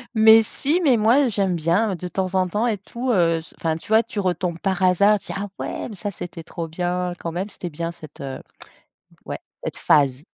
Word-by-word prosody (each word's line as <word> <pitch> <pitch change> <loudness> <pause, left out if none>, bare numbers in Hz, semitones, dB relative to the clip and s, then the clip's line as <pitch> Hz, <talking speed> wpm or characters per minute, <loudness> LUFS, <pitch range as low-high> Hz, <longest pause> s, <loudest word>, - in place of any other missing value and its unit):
Mais, 220 0 +8
si, 290 - 0
mais, 270 -8 +4
moi, 240 +6 +4
j'aime 195 -4 0
bien 175 +6 +1
de 180 +1 -6
temps 185 0 -2
en 185 -1 +2
temps 210 +6 -1
et 220 -4 0
tout, 240 +6 -3
heu, 165 -5 +3 0.2
enfin, 160 -1 0
tu 165 - -15
vois, 220 +1 +6
tu 220 - -6
retombes 180 -2 -1
par 195 0 -1
hasard, 200 +3 +4
tu - - -16
dis: - - -4
«Ah 205 - -4
ouais, - - -4
mais 220 - -8
ça, 205 +2 -4
c'était 175 -3 -7
trop 165 0 -6
bien, 180 +2 -2
quand 165 - -4
même». 180 +4 -3
C'était 180 - -7
bien 165 +2 -4
cette, 155 -3 -13
heu, 135 -1 -5 0.9
ouais, - - -5 0.2
cette - - -4
phase. 140 -2 +3
185 Hz, 220 wpm, -22 LUFS, 170-215 Hz, 0.9 s, Mais